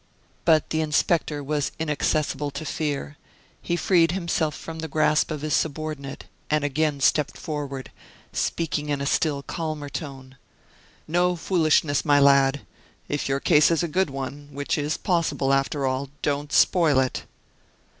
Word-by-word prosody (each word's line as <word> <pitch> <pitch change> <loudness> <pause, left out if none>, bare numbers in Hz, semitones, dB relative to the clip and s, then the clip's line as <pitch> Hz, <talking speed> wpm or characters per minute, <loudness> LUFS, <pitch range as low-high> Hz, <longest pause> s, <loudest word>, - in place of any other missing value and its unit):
But 160 -3 +3
the 160 - +1
inspector 150 -1 +1
was 145 0 -1
inaccessible 150 -2 -1
to 140 +2 -6
fear; 145 -1 -3 0.4
he 170 - -1
freed 170 -2 +3
himself 170 -4 -1
from 165 0 -8
the 160 - -4
grasp 155 0 +2
of 155 -2 -4
his 155 - -1
subordinate 150 -3 -3 0.2
and 150 -1 +1
again 145 0 0
stepped 150 +2 +2
forward, 145 -5 -5 0.4
speaking 150 -3 -1
in 145 -1 0
a 140 - -2
still 145 -1 0
calmer 155 -3 -4
tone. 135 -3 -7 0.7
"No 175 +2 +2
foolishness, 155 -5 +2
my 145 -2 +4
lad; 140 0 +4 0.5
if 145 -1 -2
your 135 0 +1
case 150 +2 +5
is 165 0 +1
a - - 0
good 185 +2 +1
one, 140 +1 -6
which 140 +1 -2
is 150 0 -1
possible, 165 -6 0
after 135 +1 0
all, 130 +1 -1
don't 145 0 -1
spoil 160 -6 +4
it." 130 -1 -1
150 Hz, 150 wpm, -24 LUFS, 140-160 Hz, 0.7 s, case